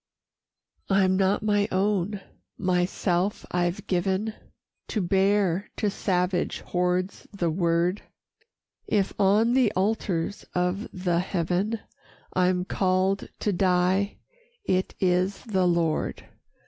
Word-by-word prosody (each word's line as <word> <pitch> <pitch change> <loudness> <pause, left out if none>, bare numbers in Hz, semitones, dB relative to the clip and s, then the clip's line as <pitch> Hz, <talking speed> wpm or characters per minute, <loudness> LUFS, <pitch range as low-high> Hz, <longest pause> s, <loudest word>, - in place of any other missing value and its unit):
IV 195 - +3
"I'm 190 -1 +4
not 195 +2 +2
my 205 -1 +2
own, 195 0 0 0.4
myself 180 +1 0
I've 180 +3 -1
given, 190 +4 0 0.5
To 220 - -2
bear 195 0 +2
to 210 -2 0
savage 180 -2 0
hordes 180 +1 -1
the 175 -5 -1
word; 170 +2 +1 0.9
If 200 -2 +1
on 210 +4 +4
the 255 -4 +4
altars 195 -2 -1
of 180 +4 0
the 180 -2 0
heaven 185 +4 -1 0.5
I'm 180 0 +2
called 190 +1 0
to 205 - +1
die, 185 +2 +2 0.5
it 185 - 0
is 185 +1 +1
the 190 -6 +1
Lord. 170 -3 0
185 Hz, 110 wpm, -26 LUFS, 180-200 Hz, 0.9 s, I'm